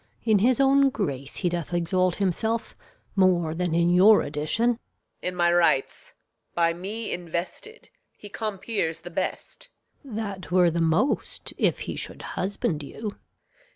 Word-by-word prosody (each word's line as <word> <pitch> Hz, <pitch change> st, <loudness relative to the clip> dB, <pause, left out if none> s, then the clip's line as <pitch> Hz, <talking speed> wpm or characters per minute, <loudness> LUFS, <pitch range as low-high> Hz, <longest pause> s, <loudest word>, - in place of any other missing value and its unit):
In 220 Hz, -3 st, +3 dB
his 245 Hz, +5 st, +3 dB
own 275 Hz, 0 st, +5 dB
grace 140 Hz, -, -4 dB
he 180 Hz, -, 0 dB
doth 175 Hz, 0 st, -3 dB
exalt 180 Hz, +1 st, +1 dB
himself 220 Hz, +4 st, -1 dB, 0.4 s
More 180 Hz, -4 st, +3 dB
than 175 Hz, -1 st, -1 dB
in 170 Hz, +1 st, +3 dB
your 200 Hz, +4 st, +6 dB
addition. 155 Hz, +11 st, 0 dB
Reg. 235 Hz, -, -5 dB, 0.4 s
In 180 Hz, -, -3 dB
my 175 Hz, -1 st, +3 dB
rights 165 Hz, -6 st, +1 dB, 0.4 s
By 170 Hz, -1 st, +3 dB
me 205 Hz, +6 st, -5 dB
invested, 175 Hz, -, -6 dB, 0.3 s
he 205 Hz, -, -10 dB
compeers 200 Hz, -5 st, -3 dB
the 175 Hz, -, -9 dB
best. -, -, -4 dB, 0.3 s
Gon. 260 Hz, -6 st, -9 dB
That 200 Hz, -4 st, -5 dB
were 180 Hz, -1 st, +4 dB
the 170 Hz, +1 st, -1 dB
most 165 Hz, -, 0 dB
if -, -, +1 dB
he -, -, -4 dB
should -, -, -3 dB
husband 185 Hz, -5 st, -2 dB
you. 210 Hz, +8 st, -6 dB
185 Hz, 150 wpm, -25 LUFS, 170-215 Hz, 0.4 s, your